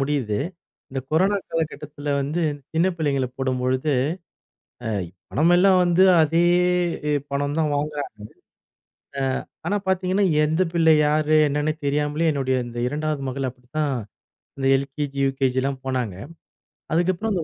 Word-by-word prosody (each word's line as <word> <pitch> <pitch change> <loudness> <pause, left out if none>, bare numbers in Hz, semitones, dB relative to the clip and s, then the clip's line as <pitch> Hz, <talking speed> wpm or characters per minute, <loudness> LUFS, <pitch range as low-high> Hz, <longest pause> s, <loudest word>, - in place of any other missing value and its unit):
முடியுது. 135 -7 0 0.5
இந்தக் 130 0 -5
கொரோனா 190 +5 +3
காலகட்டத்தில 150 -2 -3
வந்து 150 +5 -1 0.3
சின்னப் 175 +3 +2
பிள்ளைங்கள 140 -5 0
போடும்பொழுது, 130 +2 0 0.9
அ - - -1 0.4
பணம் 160 +5 +3
எல்லாம் 185 +1 +5
வந்து 175 +1 +4 0.2
அதே 165 +2 +3 0.7
ஏ - - +2 0.2
பணம் 145 +2 -1
தான் 155 -2 +1
வாங்குறாங்க. 145 -6 -4 1.0
அ - - 0 0.4
ஆனா 205 - +1
பார்த்தீங்கன்னா, 190 +1 +1 0.2
எந்தப் 165 +3 +1
பிள்ளை 165 -2 +5
யாரு 155 +1 +2
என்னன்னு 150 +2 0
தெரியாமலே, 150 +3 +1
என்னுடைய 130 -2 0
இந்த 120 0 -7
2வது 150 0 -2
மகள் 130 0 -2
அப்படித்தான். 130 +4 -3 0.6
அந்த 135 -1 -2
எல்கேஜி, 140 +1 -4
யுகேஜிலாம் 135 0 0
போனாங்க. 125 -7 -1 0.8
அதுக்கப்புறம் 180 +6 +1
அந்த 175 -4 -1
150 Hz, 125 wpm, -23 LUFS, 135-165 Hz, 1.0 s, எல்லாம்